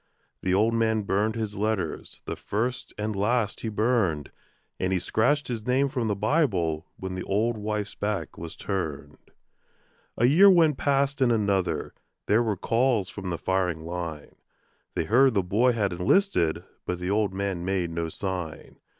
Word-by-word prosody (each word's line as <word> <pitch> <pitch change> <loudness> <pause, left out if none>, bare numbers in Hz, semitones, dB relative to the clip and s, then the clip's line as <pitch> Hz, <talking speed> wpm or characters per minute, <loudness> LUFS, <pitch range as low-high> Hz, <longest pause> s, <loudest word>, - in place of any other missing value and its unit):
The 95 0 +1
old 110 +4 +3
man 110 -1 +1
burned 105 +3 0
his 110 -2 -3
letters, 105 -6 -2
the - - -3
first 120 +5 -3
and 105 0 -2
last 105 +1 0
he 115 - -2
burned, 105 - 0 0.5
And 95 - 0
he 95 - +2
scratched 125 - +1
his 115 -2 -4
name 135 +2 +2
from 125 -4 -1
the 105 - 0
Bible 100 - +1
when 95 0 -5
the 95 - -4
old 110 +5 0
wife's 105 -1 -3
back 105 -1 -3
was 85 0 -8
turned. 75 -7 -5 0.9
A 120 - +3
year 170 +10 +7
went 165 -6 +4
past 140 0 +1
and 125 -2 +4
another. 100 -7 0 0.3
There 110 +3 +3
were 110 -4 0
calls 115 -2 +1
from 95 -3 -6
the 85 - -2
firing 90 -4 -1
line; 85 -3 -6 0.6
They - - +1
heard 130 +2 +4
the 100 - +3
boy 115 +8 +3
had 100 -5 0
enlisted, 90 - +2 0.2
but 90 - -1
the 90 +2 -3
old 105 -1 +1
man 95 -2 -3
made 90 -2 -1
no 85 0 -2
sign. 90 -3 -5
105 Hz, 165 wpm, -26 LUFS, 90-120 Hz, 0.9 s, year